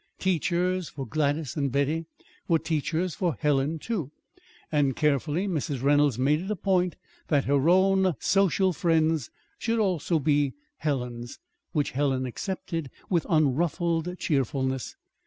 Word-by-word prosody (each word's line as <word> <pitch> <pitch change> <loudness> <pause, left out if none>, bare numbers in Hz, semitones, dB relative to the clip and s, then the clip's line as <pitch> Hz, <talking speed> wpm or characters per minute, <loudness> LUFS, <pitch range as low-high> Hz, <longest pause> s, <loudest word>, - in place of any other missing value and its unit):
Teachers 180 0 0
for 135 -2 -6
Gladys 145 +2 -1
and 140 -4 0
Betty 145 +5 0 0.4
were 165 - +4
teachers 165 +2 -1
for 175 - -1
Helen, 145 +2 +1
too; 170 - -3 0.6
and 145 -4 +2
carefully 150 +5 +1
Mrs. 145 -7 -2
Reynolds 145 -3 +3
made 145 +5 +2
it 190 - -6
a 210 - 0
point 180 -1 +1 0.3
that 145 -3 +2
her 140 +3 +3
own 190 -1 +4
social 190 - +2
friends 160 - +1 0.3
should 230 0 0
also 180 -6 +1
be 145 -1 +2 0.2
Helen's 125 -5 -3 0.4
which 150 -4 0
Helen 135 -1 0
accepted 165 - -4 0.2
with 170 -3 +1
unruffled 165 +3 +1
cheerfulness. 130 -3 -1
155 Hz, 130 wpm, -27 LUFS, 140-180 Hz, 0.6 s, were